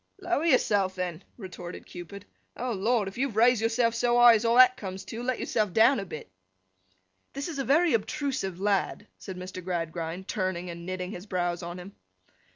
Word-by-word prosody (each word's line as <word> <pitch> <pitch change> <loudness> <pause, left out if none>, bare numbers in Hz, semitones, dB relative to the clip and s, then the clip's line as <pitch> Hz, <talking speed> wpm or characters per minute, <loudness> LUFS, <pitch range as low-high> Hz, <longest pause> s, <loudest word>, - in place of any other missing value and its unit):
'Lower 350 -4 -1
yourself, 205 - +2
then,' 180 -3 -4
retorted 180 -4 -8
Cupid. 185 +3 -10 0.3
'Oh 250 0 -2
Lord! 215 +1 +1
if 195 +5 -7
you've 265 -5 -1
raised 235 +1 +4
yourself 230 +1 +2
so 240 +1 +2
high 240 -1 +9
as 225 0 +1
all 230 +1 +3
that 255 0 +7
comes 190 -3 -7
to, 230 - -6
let 255 0 -2
yourself 210 -5 -1
down 230 +3 +5
a 195 - -4
bit.' 155 - -9 1.0
'This 275 +4 -4
is 305 -4 -5
a - - 0
very 320 +6 +3
obtrusive 230 - -2
lad!' 200 0 0
said 190 -2 -8
Mr. 185 0 -7
Gradgrind, 170 +1 -4
turning, 185 -3 -2
and 170 +1 -9
knitting 185 0 -4
his 185 +1 -8
brows 175 -2 -1
on 175 +1 -6
him. 185 +2 -10
200 Hz, 185 wpm, -28 LUFS, 180-245 Hz, 1.0 s, high